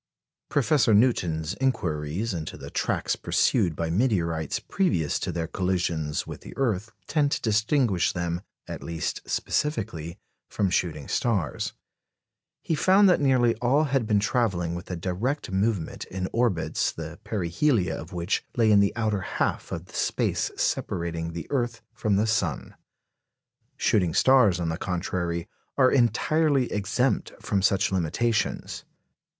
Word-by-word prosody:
Professor 135 -4 +3
Newton's 90 -8 +2
inquiries 90 - -1
into 80 -3 -5
the - - -9
tracks - - 0
pursued 85 -3 +1
by 80 0 -2
meteorites 85 - 0
previous 165 - 0
to - - -2
their 85 -1 -2
collisions 85 -4 -1
with - - -8
the - - -11
earth 115 -5 0
tend 145 +2 +1
to - - -2
distinguish 110 - +2
them, 85 -1 -2 0.3
at - - -6
least 85 -1 -3
specifically, 95 - -2 0.3
from 100 -3 0
shooting 80 -6 -1
stars. 100 - -1 0.9
He - - -1
found 190 +6 +5
that 180 - +3
nearly 125 -4 +4
all 125 +6 +2
had 135 -6 0
been 105 -1 +3
travelling 100 -6 0
with 85 +1 -7
a 90 - -2
direct 95 - -2
movement 95 -3 -1
in 95 0 -4
orbits 115 -9 +1
the 80 +2 -8
perihelia 100 - 0
of 85 - -8
which 90 +1 -1
lay 115 -2 +4
in 105 - +6
the 100 -1 +2
outer 110 -4 0
half - - -2
of - - -4
the - - -18
space - - 0
separating 85 -1 -1
the 85 - -5
earth 120 -4 -1
from 105 -2 0
the 105 +3 +2
sun. 110 0 -1 1.0
Shooting 90 -6 +2
stars, 125 -9 +5
on 85 -2 -1
the 80 - -2
contrary, 85 -2 -2 0.3
are 130 -2 +5
entirely 135 +3 +2
exempt 100 -3 0
from 100 - 0
such 95 0 +2
limitations. 95 +6 -1
100 Hz, 140 wpm, -26 LUFS, 85-120 Hz, 1.0 s, in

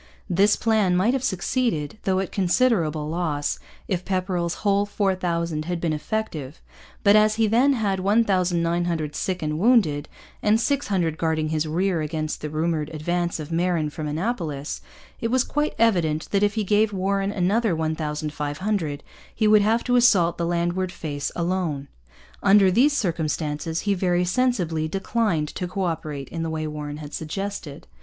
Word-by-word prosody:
This 200 +2 +4
plan 215 -5 +2
might 215 +7 +3
have 265 -2 -1
succeeded, 215 - -1
though 190 -1 +2
at 190 - -3
considerable 175 - +1
loss, 155 -3 -2 0.3
if 185 -3 -1
Pepperrell's 185 -2 -1
whole 200 0 +3
4,000 170 -6 -1
had 175 0 -2
been 165 -2 0
effective. 155 -4 -4 0.4
But 200 0 +6
as 215 0 +5
he 225 0 +2
then 245 +6 +4
had 205 -6 0
1,900 175 -6 +1
sick 185 -3 -2
and 150 0 -2
wounded, 185 - +3 0.3
and 215 +1 +3
600 200 - 0
guarding 160 -1 0
his 155 0 0
rear 175 +2 0
against 155 0 -3
the 150 - -4
rumoured 155 0 -1
advance 170 +2 -2
of 155 +1 -7
Marin 165 -2 0
from 155 0 -5
Annapolis, 155 - -3 0.4
it 230 - -1
was 255 +1 +3
quite 295 +1 -1
evident 170 -9 +2
that 200 - +2
if 205 +1 +2
he 220 - 0
gave 210 +2 +2
Warren 195 +1 0
another 205 +1 +1
1,500 155 +1 -2 0.3
he 215 - +2
would 210 0 +6
have 225 +3 +2
to 245 0 +2
assault 180 -9 +4
the 170 - 0
landward 175 +2 0
face 145 -5 -4
alone. 170 -6 -2 0.5
Under 195 -1 +5
these 265 +9 +4
circumstances 160 - -2
he 205 - +1
very 180 -1 +1
sensibly 180 -7 0
declined 195 -3 0
to 180 - -4
co 190 +2 -3
operate 155 -5 -3
in 165 - -4
the 165 - -2
way 160 0 -3
Warren 150 -1 -5
had 150 -1 -9
suggested. 165 -2 -5
175 Hz, 160 wpm, -24 LUFS, 155-205 Hz, 0.5 s, But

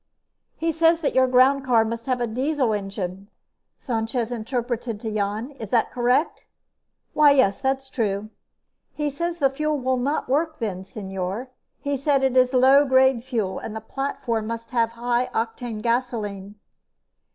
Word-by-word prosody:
"He 330 0 0
says 330 +1 +3
that 290 - 0
your 260 0 +4
groundcar 255 -2 +4
must 230 +1 -5
have 255 -1 0
a 240 - 0
diesel 255 +1 0
engine," 195 -1 -4 0.5
Sanchez 230 -1 -2
interpreted 235 -1 -3
to 220 0 -4
Jan. 215 +5 -2
"Is 220 - -6
that 230 0 +2
correct?" 250 +5 +1 0.7
"Why, 300 -1 +6
yes, 230 -8 +3
that's 265 0 -1
true." 215 -4 -2 0.6
"He 295 -1 -1
says 340 +4 -3
the 275 -4 +2
fuel 305 +2 -1
will 260 -1 0
not 280 +5 -1
work 310 +4 0
then, 190 -6 -4
señor. 195 +4 -5 0.3
He 285 0 -1
says 275 0 +1
it 265 -1 +1
is 255 -1 +5
low 265 +2 +6
grade 260 -3 +3
fuel 225 -7 -2
and 220 - -7
the - - -3
platform 230 -2 -3
must 230 0 -6
have 230 -2 +2
high 240 +1 0
octane 225 -1 -3
gasoline." 215 -5 -2
245 Hz, 155 wpm, -24 LUFS, 220-270 Hz, 0.7 s, Why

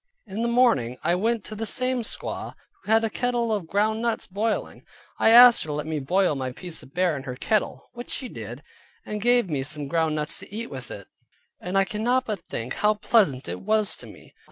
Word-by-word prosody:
In 205 +1 -5
the 235 - +1
morning 235 - +3
I 170 - +2
went 220 +4 0
to 215 - -8
the 225 +1 -3
same 255 +3 0
squaw, 225 - -5 0.3
who - - -5
had 225 0 +5
a 225 - +1
kettle 240 -2 0
of 200 -6 -2
ground 215 +4 +1
nuts 230 -2 -1
boiling. 210 +3 -2 0.4
I - - +5
asked 240 +1 +9
her - - -4
to 150 - -3
let 150 +1 -3
me 155 -1 -2
boil 180 +5 +2
my 130 -2 -3
piece 175 +3 -8
of 135 - -17
bear 180 -3 +2
in 140 - -5
her 130 -2 -6
kettle, 215 - -1
which 240 0 -8
she 260 - -4
did, 120 - -8 0.4
and 210 -1 -4
gave 240 -1 +3
me 145 -5 -1
some 145 +1 -4
ground 160 +1 +1
nuts 150 0 -2
to - - -11
eat 225 +3 -5
with 130 -3 -7
it: 100 - -8 0.5
and 180 +2 -2
I 195 - +5
cannot 245 +6 0
but 215 -5 -3
think 115 +3 -4
how 210 0 +3
pleasant 190 - +2
it - - -5
was 215 0 +2
to - - -9
me. - - -15
205 Hz, 225 wpm, -25 LUFS, 150-230 Hz, 0.5 s, asked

